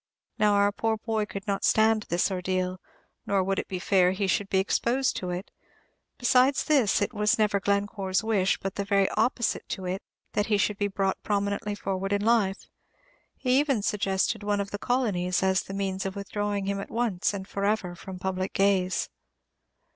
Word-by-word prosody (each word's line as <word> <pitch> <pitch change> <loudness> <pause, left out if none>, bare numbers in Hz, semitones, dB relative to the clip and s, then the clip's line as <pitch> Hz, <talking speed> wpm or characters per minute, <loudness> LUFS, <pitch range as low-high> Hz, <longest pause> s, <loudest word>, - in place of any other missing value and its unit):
Now, 210 -1 +4
our 200 0 +4
poor 220 +2 -1
boy 220 -1 -2
could 195 -1 -7
not 200 -1 -2
stand 220 -1 +3
this 175 +3 +1
ordeal, 185 0 -2 0.5
nor 195 -2 +2
would 195 +1 0
it - - -4
be 185 - -4
fair 185 0 +3
he 195 +1 -1
should 195 +1 0
be 190 - +1
exposed 235 +7 +1
to 180 - -4
it. 180 +3 -5 0.7
Besides 255 +2 +3
this, 260 -10 +3
it 205 - -3
was 210 0 +2
never 210 -2 +2
Glencore's 200 -1 0
wish, 205 -4 +2
but 195 0 -4
the 200 - 0
very 200 -1 +2
opposite 235 +1 0
to 190 - -4
it, 185 +2 -3 0.3
that 210 - 0
he 210 -2 +2
should 205 0 0
be 205 - +1
brought 195 -1 -1
prominently 205 0 -1
forward 195 0 -2
in 205 +1 0
life. 215 -4 +2 0.7
He 255 0 +2
even 275 -8 +1
suggested 200 +1 0
one 205 0 0
of 200 0 -3
the 205 - -4
Colonies 195 -9 0
as 190 -1 +3
the 195 - -8
means 195 -1 -2
of 190 - -6
withdrawing 205 0 -2
him 200 0 -1
at 195 - -6
once, 225 -6 0
and 195 -2 -6
forever, 200 -2 -1
from 185 +1 -9
public 185 +1 -3
gaze. 190 -2 +2
200 Hz, 185 wpm, -27 LUFS, 190-215 Hz, 0.7 s, Now